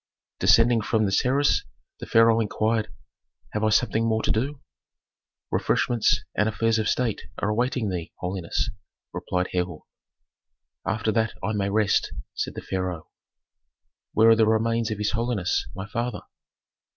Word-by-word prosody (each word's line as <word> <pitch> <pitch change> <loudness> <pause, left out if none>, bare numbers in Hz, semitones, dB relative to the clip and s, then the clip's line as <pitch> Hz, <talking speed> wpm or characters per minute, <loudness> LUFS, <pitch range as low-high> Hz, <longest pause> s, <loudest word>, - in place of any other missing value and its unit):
Descending 115 0 +5
from 110 0 +1
the 95 - 0
terrace 135 +8 +2 0.4
the - - -7
pharaoh 115 0 +5
inquired, 110 0 0 0.6
"Have 105 - -2
I 110 - +3
something 110 +1 +2
more 110 -1 0
to - - +1
do?" 135 +6 -1 0.9
"Refreshments 120 -3 +1
and 105 +1 +2
affairs 115 +1 +1
of 110 - 0
state 120 -4 -1
are 105 - -1
awaiting 120 0 0
thee, 90 -3 -4
holiness," 90 -1 -2 0.4
replied 90 0 -2
Herhor. 90 -3 -2 1.0
"After 110 0 0
that 110 +1 0
I 110 +4 -1
may 100 -1 0
rest," 105 -1 +1 0.2
said - - -3
the - - -6
pharaoh. 90 -4 -3 1.0
"Where 110 +1 +5
are - - +7
the 110 -1 +3
remains 115 +1 +1
of 110 - -3
his 105 0 0
holiness, 115 -5 -1
my 95 +2 -6
father?" 120 0 -3
110 Hz, 145 wpm, -25 LUFS, 100-115 Hz, 1.0 s, are